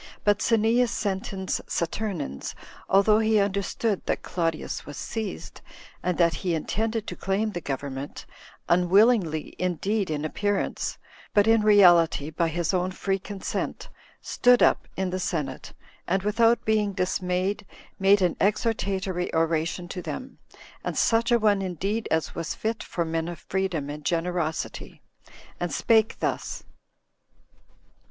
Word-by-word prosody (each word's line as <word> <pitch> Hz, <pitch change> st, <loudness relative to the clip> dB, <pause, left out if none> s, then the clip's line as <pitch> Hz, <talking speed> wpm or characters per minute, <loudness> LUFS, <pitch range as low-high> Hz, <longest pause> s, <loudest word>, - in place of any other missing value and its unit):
But 205 Hz, 0 st, +3 dB
Cneas 230 Hz, +2 st, +3 dB
Sentins 190 Hz, -3 st, -2 dB
Saturninus, 170 Hz, -, -3 dB, 0.3 s
although 205 Hz, +2 st, +5 dB
he 220 Hz, 0 st, +3 dB
understood 200 Hz, +1 st, 0 dB
that -, -, -1 dB
Claudius 165 Hz, -3 st, -2 dB
was 145 Hz, -1 st, -9 dB
seized, 220 Hz, -2 st, -5 dB, 0.4 s
and 180 Hz, -1 st, -1 dB
that 170 Hz, -2 st, +4 dB
he 175 Hz, -3 st, 0 dB
intended 220 Hz, +7 st, -2 dB
to -, -, -5 dB
claim 200 Hz, +3 st, -1 dB
the 175 Hz, -3 st, -5 dB
government, 140 Hz, -1 st, -5 dB, 0.4 s
unwillingly 180 Hz, -2 st, +3 dB
indeed 185 Hz, +3 st, -1 dB
in 155 Hz, -1 st, -2 dB
appearance, 205 Hz, +5 st, -1 dB, 0.4 s
but 205 Hz, -1 st, +6 dB
in 225 Hz, 0 st, +4 dB
reality 175 Hz, -7 st, +5 dB
by 165 Hz, +2 st, 0 dB
his 165 Hz, +1 st, -1 dB
own 180 Hz, 0 st, +1 dB
free 195 Hz, +1 st, -2 dB
consent, 195 Hz, 0 st, -4 dB, 0.3 s
stood 245 Hz, 0 st, +4 dB
up -, -, +3 dB
in 190 Hz, -1 st, -1 dB
the 185 Hz, -, -2 dB
senate, 160 Hz, -5 st, -3 dB, 0.4 s
and, 190 Hz, +2 st, +1 dB
without 230 Hz, +3 st, +3 dB
being 215 Hz, -2 st, +1 dB
dismayed, 185 Hz, +1 st, -1 dB, 0.4 s
made 195 Hz, 0 st, +5 dB
an 175 Hz, -, +2 dB
exhortatory 195 Hz, -3 st, 0 dB
oration 165 Hz, +2 st, 0 dB
to 180 Hz, -, -5 dB
them, 260 Hz, +8 st, -7 dB, 0.4 s
and -, -, -3 dB
such 230 Hz, +1 st, +2 dB
a 240 Hz, -, +6 dB
one 210 Hz, -3 st, +2 dB
indeed 195 Hz, +4 st, -2 dB
as 160 Hz, 0 st, 0 dB
was 165 Hz, -2 st, -4 dB
fit 220 Hz, +1 st, -2 dB
for 170 Hz, -, -3 dB
men 165 Hz, 0 st, -2 dB
of 175 Hz, -1 st, -5 dB
freedom 185 Hz, -6 st, -2 dB
and 150 Hz, 0 st, -8 dB
generosity, 170 Hz, -1 st, -2 dB, 0.6 s
and 175 Hz, -1 st, -2 dB
spake 220 Hz, +8 st, +3 dB
thus: -, -, -2 dB
2. -, -, -33 dB
190 Hz, 135 wpm, -26 LUFS, 170-210 Hz, 0.6 s, but